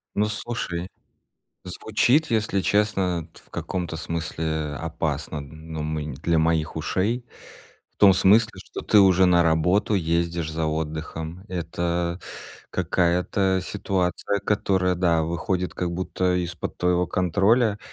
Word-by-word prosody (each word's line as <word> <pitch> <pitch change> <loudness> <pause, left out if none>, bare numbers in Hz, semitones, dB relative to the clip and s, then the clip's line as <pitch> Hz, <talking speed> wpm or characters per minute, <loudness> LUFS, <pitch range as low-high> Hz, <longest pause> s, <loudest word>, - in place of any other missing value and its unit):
Ну, 105 - +2
слушай, 105 -5 -3 0.8
звучит, 120 - +1
если 110 -3 +1
честно, 95 -5 +1
т - - -16
в - - -28
каком-то 90 -3 -4
смысле 80 -2 -3
опасно, 80 -2 -3
ну, 80 +2 -8
мы 75 0 -3
нь 75 -3 -5
для 80 +3 0
моих 80 -1 +1
ушей. 105 +10 -1 0.7
В - - -44
том 100 -1 +9
смысле, 110 +4 +5
что - - -7
ты 105 - +4
уже 95 -1 +5
на 85 -1 +5
работу 90 +6 +2
ездишь 85 -2 0
за 80 0 -1
отдыхом. 80 +2 -4
Это 85 0 -2 0.5
какая-то 90 +2 +1
ситуация, 100 0 -1
которая, 95 -3 +1
да, 85 -2 +2
выходит 85 +3 -2
как 85 -1 -2
будто 90 0 -1
из-под 85 -2 -6
твоего 90 0 +2
контроля. 100 +6 +2
90 Hz, 125 wpm, -24 LUFS, 80-95 Hz, 0.8 s, том